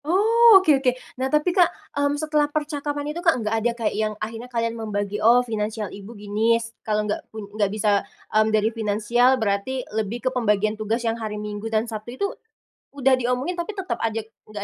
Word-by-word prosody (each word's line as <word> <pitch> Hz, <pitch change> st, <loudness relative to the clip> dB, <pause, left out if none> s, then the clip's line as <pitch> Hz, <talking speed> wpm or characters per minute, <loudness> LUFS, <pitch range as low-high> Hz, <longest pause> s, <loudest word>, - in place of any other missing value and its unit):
Oh 440 Hz, +6 st, +6 dB
oke 310 Hz, -8 st, +4 dB
oke. 255 Hz, -2 st, +3 dB, 0.3 s
Nah 265 Hz, -, 0 dB
tapi 300 Hz, +5 st, +2 dB
Kak, 355 Hz, -2 st, +5 dB, 0.2 s
mmm, 285 Hz, 0 st, 0 dB
setelah 300 Hz, -1 st, +1 dB
percakapan 295 Hz, -1 st, -3 dB
itu 345 Hz, -, -5 dB
Kak, 330 Hz, -5 st, +3 dB
enggak 220 Hz, -2 st, -1 dB
ada 240 Hz, +2 st, +1 dB
kayak 230 Hz, -3 st, -1 dB
yang 215 Hz, 0 st, -1 dB
akhirnya 225 Hz, +3 st, -6 dB
kalian 230 Hz, -1 st, -1 dB
membagi 210 Hz, -2 st, -3 dB
oh 240 Hz, +3 st, +5 dB
finansial 215 Hz, -2 st, -3 dB
ibu 205 Hz, +3 st, -10 dB
gini, 210 Hz, +3 st, +1 dB, 0.2 s
kalau 210 Hz, -1 st, -1 dB
enggak 210 Hz, -, -2 dB
pu 220 Hz, -2 st, -8 dB
enggak 210 Hz, -2 st, +1 dB
bisa, 205 Hz, -1 st, +1 dB, 0.3 s
mmm, 215 Hz, 0 st, +4 dB
dari 215 Hz, 0 st, +2 dB
finansial, 230 Hz, +4 st, +2 dB
berarti, 220 Hz, +4 st, -1 dB
lebih 220 Hz, +3 st, -3 dB
ke -, -, +4 dB
pembagian 215 Hz, -3 st, +1 dB
tugas 220 Hz, +2 st, -2 dB
yang 230 Hz, 0 st, -1 dB
hari 215 Hz, -1 st, -4 dB
Minggu 210 Hz, +1 st, -5 dB
dan 220 Hz, 0 st, +1 dB
Sabtu 230 Hz, +2 st, -7 dB
itu, 400 Hz, -, 0 dB, 0.7 s
udah 270 Hz, -2 st, +3 dB
diomongin 255 Hz, +8 st, -1 dB
tapi 345 Hz, +5 st, -3 dB
tetep 385 Hz, -2 st, -3 dB
aja 225 Hz, 0 st, -1 dB, 0.2 s
enggak 210 Hz, -1 st, -7 dB
230 Hz, 195 wpm, -23 LUFS, 215-285 Hz, 0.7 s, Oh